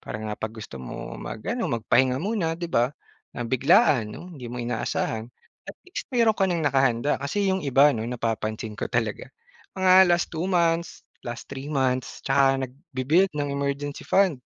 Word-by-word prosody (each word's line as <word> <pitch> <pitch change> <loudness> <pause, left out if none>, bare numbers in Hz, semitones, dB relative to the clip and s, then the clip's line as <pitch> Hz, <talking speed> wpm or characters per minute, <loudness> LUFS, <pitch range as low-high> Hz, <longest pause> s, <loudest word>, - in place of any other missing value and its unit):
parang 110 0 -5
ah, 105 - -5
pag 110 0 -4
gusto 110 -11 -9
mo 65 - -7
mag-ano 230 - -4
magpahinga 125 +3 +2
muna 195 -6 -1
di 170 0 -5
ba, 120 +1 +3 0.5
ng 120 - -3
biglaan 130 - +4
'no 180 - -9
hindi 130 -6 -8
mo 125 - -5
inaasahan 115 -1 -2 0.4
at - - -8
least 370 - -7
meron 235 -4 +3
ka 195 -3 +1
nang 170 -3 -1
nakahanda. 135 -1 +2
Kasi 195 +8 -1
yung 190 - 0
iba 140 0 +5
'no 115 - -3
napapansin 110 -2 -3
ko - - -3
talaga, 115 -3 -2 0.5
mga 185 0 +6
last 175 0 +1
2 165 +3 -2
months, 170 -2 +1 0.2
last 120 0 -5
3 135 +1 -6
months 130 -3 -1
'tsaka 135 0 +3
nagbi-build 150 +6 0
ng 145 -1 -1
emergency 140 +1 -3
fund 190 -7 +3
140 Hz, 170 wpm, -25 LUFS, 120-175 Hz, 0.5 s, mga